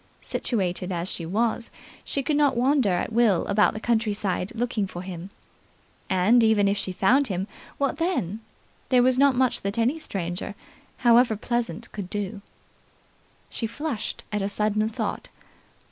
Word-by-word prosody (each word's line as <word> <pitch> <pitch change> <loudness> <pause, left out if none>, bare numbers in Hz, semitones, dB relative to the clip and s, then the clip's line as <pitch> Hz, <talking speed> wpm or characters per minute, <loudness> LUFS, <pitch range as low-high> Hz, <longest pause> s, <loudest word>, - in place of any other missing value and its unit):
Situated 185 -5 -2
as 175 0 -2
she 165 - -5
was, 225 +5 0 0.3
she 275 - -2
could 300 +2 0
not 290 -4 +3
wander 260 -2 +3
at 180 +4 -1
will 220 -6 +3
about 210 +1 +3
the - - -3
countryside, 210 -4 0
looking 230 -4 -1
for 175 -1 -7
him. 185 0 -7 0.8
And, 200 +6 +4
even 215 -2 +4
if 200 - +2
she 195 -1 -3
found 250 +10 +3
him, 190 -1 -2 0.3
what 280 0 0
then? 310 - -1 0.5
There 250 -2 +5
was 255 0 +3
not 280 -1 +5
much 255 0 +1
that 200 +3 -3
any 245 +8 +1
stranger, 180 - -4 0.5
however 235 -1 +6
pleasant, 235 +1 -3
could 200 -4 -6
do. 200 -1 -4 1.1
She 225 - -2
flushed 240 0 -4
at 210 -1 -1
a 195 - -1
sudden 215 +1 0
thought. 225 - -4
215 Hz, 155 wpm, -25 LUFS, 195-245 Hz, 1.1 s, however